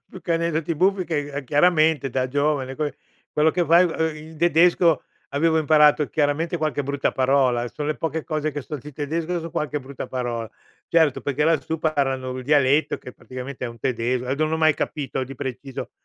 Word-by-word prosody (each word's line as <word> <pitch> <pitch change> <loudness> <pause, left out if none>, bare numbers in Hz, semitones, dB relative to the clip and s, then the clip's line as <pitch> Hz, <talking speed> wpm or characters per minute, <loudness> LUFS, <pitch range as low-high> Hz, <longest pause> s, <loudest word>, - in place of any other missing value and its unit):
più 185 - -11
che 170 - -1
aneddoti 165 -1 -1
buffi, 190 +2 +2
che 145 -4 -3
a 145 - -3
chiaramente 155 +1 +3
da 130 +1 -1
giovane 140 -1 0
que 150 -3 -3 0.4
quello 155 +1 +3
che 175 +2 0
fai 170 +3 +6 0.4
il 160 0 -12
tedesco 170 -1 +4 0.3
avevo 160 +3 +2
imparato 150 -1 +4
chiaramente 160 +3 0
qualche 155 -3 -1
brutta 140 0 -1
parola, 130 -2 +2
son 150 +3 -5
le 155 - -1
poche 160 0 -2
cose 155 -1 -2
che 145 -1 -4
so 150 - -6
di 150 +2 -10
tedesco 160 +5 -2
son 165 +1 -7
qualche 150 0 -2
brutta 135 +1 -7
parola. 120 -3 -3 0.4
Certo, 160 -5 +3
perché 145 +1 -1
lassù 160 0 +1
parlano 135 -5 -1
il 130 - -5
dialetto 145 +1 +3
che 125 - -10
praticamente 130 +1 -7
è 120 - -2
un 115 - -11
tedesco 125 +1 -1
a 130 - 0
d - - -10
non 155 0 +1
ho 160 - +2
mai 155 -1 +4
capito 140 -3 -3
di 135 - -9
preciso. 135 0 -6
150 Hz, 195 wpm, -23 LUFS, 135-160 Hz, 0.4 s, fai